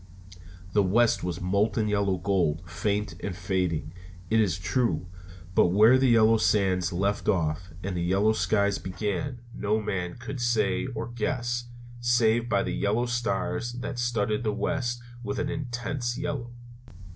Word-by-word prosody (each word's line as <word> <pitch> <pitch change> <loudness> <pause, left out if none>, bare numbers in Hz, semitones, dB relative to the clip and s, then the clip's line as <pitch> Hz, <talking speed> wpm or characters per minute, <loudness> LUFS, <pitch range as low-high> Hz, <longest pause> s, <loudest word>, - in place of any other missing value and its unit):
The 105 - +4
west 110 +5 +3
was 90 -2 -3
molten 100 +4 +1
yellow 100 -2 +1
gold, 90 -3 0
faint 100 +5 -1
and 100 -3 -4
fading, 90 -3 -1 0.4
it 110 - +4
is 95 -6 +2
true: 115 +1 0 0.5
but - - +5
where 105 +7 +6
the 130 -1 +3
yellow 115 -1 +5
sands 95 -4 +2
left 100 +4 0
off 85 -2 0
and 95 -1 -3
the 85 - -1
yellow 100 +5 +3
skies 100 +1 +1
began 105 +7 -3
no 105 0 0
man 95 -4 -3
could 120 +2 -6
say 110 -4 +1
or 115 - -3
guess, 120 +1 -2 0.3
save 120 -1 +2
by 100 -3 +2
the - - -3
yellow 110 +4 +1
stars 120 0 -1
that 125 0 -5
studded 115 -2 0
the 110 - +1
west 120 -4 -2 0.2
with 105 - -3
an 145 - -1
intense 120 -2 -3
yellow. 145 -5 -3
105 Hz, 150 wpm, -27 LUFS, 95-120 Hz, 0.5 s, where